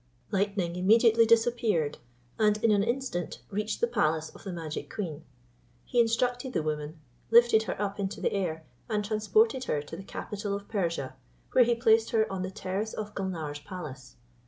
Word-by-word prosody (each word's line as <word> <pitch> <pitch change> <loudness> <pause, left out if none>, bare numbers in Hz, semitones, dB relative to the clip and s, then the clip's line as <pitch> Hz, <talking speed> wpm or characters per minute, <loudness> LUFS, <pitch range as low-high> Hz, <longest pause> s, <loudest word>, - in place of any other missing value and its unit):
Lightning 195 -3 0
immediately 225 +4 +5
disappeared, 225 -9 +2 0.4
and 210 -1 +4
in 225 - +5
an 205 -1 +4
instant 235 -6 -2
reached 210 +2 -2
the 235 - +4
palace 160 -9 0
of - - -15
the 195 - -5
magic 165 -3 -5
queen. 165 -7 -5 0.6
He 245 - 0
instructed 245 +2 +1
the 160 - 0
woman, 155 +1 -3 0.3
lifted 235 -1 +6
her - - -4
up 205 0 -2
into 195 0 -3
the - - 0
air, 165 -5 -2 0.2
and 210 -2 0
transported 255 - +2
her 150 - 0
to 150 - -8
the 180 - -7
capital 205 +1 -4
of 200 0 -7
Persia, 170 - -2 0.4
where 250 - +6
he 240 0 +2
placed 225 -1 +4
her 220 -1 +3
on 190 - -3
the 185 - -2
terrace 190 +3 -3
of 210 -1 -5
Gulnare's 165 -7 -4
palace. 150 -5 -9
205 Hz, 175 wpm, -29 LUFS, 170-225 Hz, 0.6 s, lifted